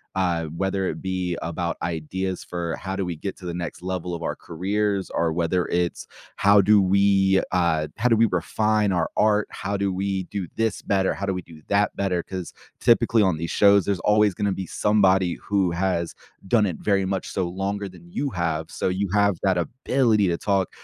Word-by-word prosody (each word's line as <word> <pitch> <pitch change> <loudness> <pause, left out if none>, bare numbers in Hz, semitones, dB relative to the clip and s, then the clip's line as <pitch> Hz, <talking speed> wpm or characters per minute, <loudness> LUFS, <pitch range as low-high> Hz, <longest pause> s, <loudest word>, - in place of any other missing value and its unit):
uh, 85 -3 0
whether 95 +4 -2
it - - -4
be 95 -2 -2
about 85 +1 -3
ideas 85 +3 -3
for 85 -2 -4
how 95 0 -5
do 100 - -1
we 85 -2 -3
get 95 +4 -5
to 90 - -12
the 85 - -3
next 85 0 -5
level 90 -1 -3
of 85 - -7
our - - -2
careers, 100 +3 -2
or 85 -1 0
whether 85 +1 0
it's 85 0 -1 0.3
how 100 0 +6
do 105 +1 +5
we, 95 0 +3
uh 80 -4 +2
how 125 - +1
do 115 - +5
we 115 +1 +4
refine 105 +4 +1
our 85 -2 0
art, 105 -1 +3
how 100 +2 -4
do 100 -1 0
we 95 0 -1
do 100 -4 -3
this 115 -2 -1
better, 95 -1 +1
how 100 - -4
do 95 - 0
we 90 - -4
do 80 -2 -15
that 100 0 +2
better, 90 -3 0
'cause 95 -2 -6 0.3
typically 115 -2 +4
on 90 -5 +2
these 85 +1 -4
shows, 100 -2 +5
there's 100 -3 0
always 105 -1 +3
gonna 100 -1 0
be 95 0 -4
somebody 95 -4 +2
who 95 -4 +1
has 85 -1 -1 0.3
done 105 0 +3
it 85 - -4
very 100 -2 +1
much 95 -1 -2
so 95 -3 -1
longer 100 +2 -3
than 85 -1 -15
you 140 +9 -2
have, 80 -5 -2
so - - -2
you 95 +1 -1
have 100 -2 +3
that 95 -2 +2
ability 115 +1 +1
to 85 - 0
talk 100 -2 0
95 Hz, 205 wpm, -24 LUFS, 85-100 Hz, 0.3 s, how